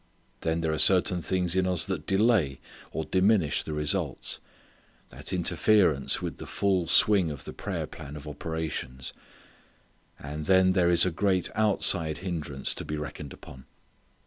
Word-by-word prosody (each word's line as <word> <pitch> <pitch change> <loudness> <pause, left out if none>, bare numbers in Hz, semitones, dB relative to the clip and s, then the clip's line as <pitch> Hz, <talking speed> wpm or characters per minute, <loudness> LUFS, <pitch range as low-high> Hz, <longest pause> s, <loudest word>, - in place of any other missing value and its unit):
Then 80 0 -1
there 80 -1 0
are 80 - -2
certain 90 -1 +4
things 90 +1 0
in 95 0 +2
us 90 -3 +2
that 95 -5 -4
delay, 95 - +2 0.3
or 80 - -3
diminish 95 -3 +2
the 80 - -6
results; 75 0 -1 0.7
that - - -6
interfere 90 +1 +3 0.3
with - - -5
the - - -9
full 95 -4 0
swing 100 -3 +4
of 70 -3 -7
the - - -7
prayer - - -4
plan 75 -1 -10
of 75 0 -9
operations. 75 -4 -5 1.0
And 75 +2 -6
then 95 0 +5
there 90 -2 +3
is 85 0 +6
a 95 - 0
great 95 +1 0
outside 90 -7 +2
hindrance 75 -7 -2
to - - -7
be 75 - -4
reckoned 75 -1 -7
upon. 65 0 -13
85 Hz, 155 wpm, -27 LUFS, 75-95 Hz, 1.0 s, is